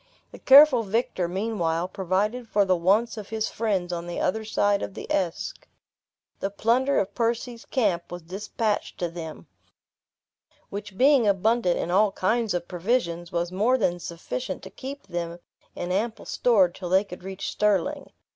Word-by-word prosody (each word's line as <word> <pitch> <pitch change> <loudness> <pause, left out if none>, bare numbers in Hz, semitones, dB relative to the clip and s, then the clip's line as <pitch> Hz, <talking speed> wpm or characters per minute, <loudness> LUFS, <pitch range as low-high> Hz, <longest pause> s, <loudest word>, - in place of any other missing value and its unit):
The - - -12
careful 275 -2 +8
victor, 205 -4 -1
meanwhile, 180 -3 -1
provided 200 +6 -1
for 205 -1 +3
the 185 -1 +3
wants 205 +7 +2
of 210 -2 -7
his 220 -1 -2
friends 195 -6 -1
on 170 0 -4
the 175 - -4
other 220 +4 0
side 205 -2 +1
of 195 - -5
the - - -6
Esk. 180 -4 -2 0.7
The 195 - -1
plunder 240 +7 +1
of 195 - -2
Percy's 235 0 -2
camp 195 -9 0
was 175 -1 -7
dispatched 205 +4 -3
to 175 - -2
them; 165 -2 -8 1.3
which 200 -1 -7
being 265 -2 +5
abundant 200 -1 +2
in 175 - -2
all 200 +2 +3
kinds 220 +1 0
of 175 -1 -3
provisions, 175 -3 -1
was 170 0 -1
more 220 +8 +2
than 175 -6 0
sufficient 175 +9 -5
to - - -9
keep 275 +2 -8
them 170 0 -4 0.4
in 175 +1 -4
ample 220 +4 -2
store 215 -7 +3
till 175 +1 -8
they 190 +2 +4
could 180 -3 -10
reach 190 0 -5
Stirling. 205 -5 0
200 Hz, 165 wpm, -25 LUFS, 175-225 Hz, 1.3 s, careful